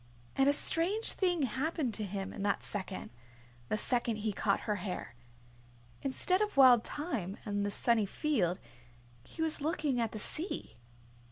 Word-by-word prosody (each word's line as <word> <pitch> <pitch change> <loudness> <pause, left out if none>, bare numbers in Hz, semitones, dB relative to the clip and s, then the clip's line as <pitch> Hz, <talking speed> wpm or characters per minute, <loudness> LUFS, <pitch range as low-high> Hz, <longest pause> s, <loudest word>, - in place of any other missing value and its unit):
And 270 +1 +3
a - - +6
strange 345 +9 +4
thing 355 -5 0
happened 270 +1 -2
to 210 - +1
him 195 -1 -5
in 205 - -7
that 200 0 -1
second, 190 - -6 0.6
the - - 0
second 240 0 0
he 215 0 -3
caught 200 +1 0
her 210 -2 -2
hair. 180 - -6 0.9
Instead 365 +8 +3
of 420 -8 -2
Wild 250 -4 +7
Thyme 240 - -4
and 205 -1 -2
the 205 - -1
sunny 220 0 +1
field, 190 - -1 0.6
he 320 - -6
was 315 -2 -3
looking 295 -5 -1
at 225 -1 -2
the - - -7
sea. 215 - +1
240 Hz, 160 wpm, -31 LUFS, 205-305 Hz, 0.9 s, Wild